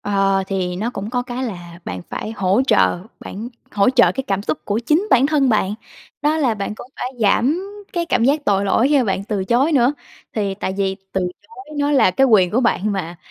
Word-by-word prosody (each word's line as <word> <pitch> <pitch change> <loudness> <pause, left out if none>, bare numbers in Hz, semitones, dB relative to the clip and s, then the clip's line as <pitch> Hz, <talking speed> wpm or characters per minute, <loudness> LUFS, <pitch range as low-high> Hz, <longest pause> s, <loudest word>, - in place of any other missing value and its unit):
ờ, 195 -1 +1
thì 185 -2 -2
nó 220 +6 -2
cũng 210 -2 -6
có 245 -1 0
cái 250 +1 -4
là 175 -6 -7
bạn 90 0 -5
phải 220 - -4
hỗ 195 +6 +2
trợ 215 -6 +3 0.2
bản 220 +5 -7 0.2
hỗ 200 +2 +3
trợ 255 -2 +4
cái 265 0 -4
cảm 195 -2 -1
xúc 155 -6 -2
của 205 +1 -1
chính 305 - +1
bản 260 +2 +5
thân 285 -3 +2
bạn, 210 -2 +1 0.5
đó 305 +2 +2
là 260 -8 +1
bạn 205 +1 -4
cũng 240 - -10
phải - - -3
giảm 245 - +3 0.3
cái 340 -2 -1
cảm 230 - +1
giác 290 +2 +2
tội 200 -1 +2
lỗi 225 +6 +3
khi 290 -1 +4
mà 250 - +2
bạn 195 -1 -1
từ 200 -3 -2
chối 260 +9 +2
nữa. 265 +1 +3 0.4
Thì 200 -3 -1
tại 190 -1 -3
vì 195 -1 0 0.2
từ 190 - 0 0.2
chối 255 +8 -12
nó 285 0 +1
là 270 -10 +4
cái 270 +8 +3
quyền 195 -7 +4
của 240 +7 +2
bạn 215 -3 +1
mà, 175 -3 -4
220 Hz, 230 wpm, -20 LUFS, 195-260 Hz, 0.5 s, bản